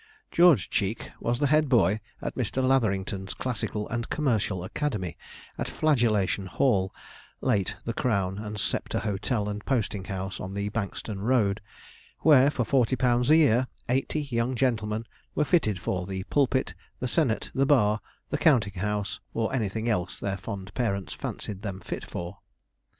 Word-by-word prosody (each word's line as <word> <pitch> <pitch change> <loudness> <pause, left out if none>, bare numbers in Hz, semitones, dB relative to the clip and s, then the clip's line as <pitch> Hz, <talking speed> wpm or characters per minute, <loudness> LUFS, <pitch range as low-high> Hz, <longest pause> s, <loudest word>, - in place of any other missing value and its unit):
George 175 -4 +6
Cheek 105 +2 -1
was 120 +1 0
the 145 - +3
head 150 0 +3
boy 105 -5 +4 0.2
at - - -2
Mr. 130 - -1
Latherington's 100 -6 0
classical 110 -4 -2
and 120 0 -3
commercial 110 - 0
academy, 100 - -2 0.4
at - - -1
Flagellation 110 -10 +2
Hall 95 -3 +2 0.5
(late 105 -8 +1
the 115 - -2
Crown 100 -6 0
and 105 -1 -5
Sceptre - - -1
Hotel 105 +1 -1
and 105 0 -4
Posting 105 -7 -1
House, 95 0 -4
on 95 +1 -5
the 100 +1 -1
Bankstone 105 -1 -4
road), 110 -2 +2 0.6
where, 140 -3 +7
for 135 -4 0
forty 130 +1 +3
pounds 125 0 +2
a 155 - +8
year, 130 -5 +4 0.2
eighty 135 +4 0
young 125 -2 -1
gentlemen 110 -3 0 0.3
were 150 - +2
fitted 125 - +2
for 90 0 -2
the 95 -1 -3
pulpit, 130 -2 +2 0.3
the 125 - -1
senate, 125 -4 +1
the 135 0 +2
bar, 110 -7 +4 0.3
the - - 0
counting 110 - +3
house, 105 -1 -2 0.2
or 115 +1 0
anything 110 -2 -1
else 95 -6 -1
their 95 -1 -2
fond 95 -1 -7
parents 100 -6 -1
fancied 100 -2 -5
them 100 -3 -4
fit 85 - -5
for. 85 0 -6
110 Hz, 155 wpm, -27 LUFS, 100-130 Hz, 0.6 s, a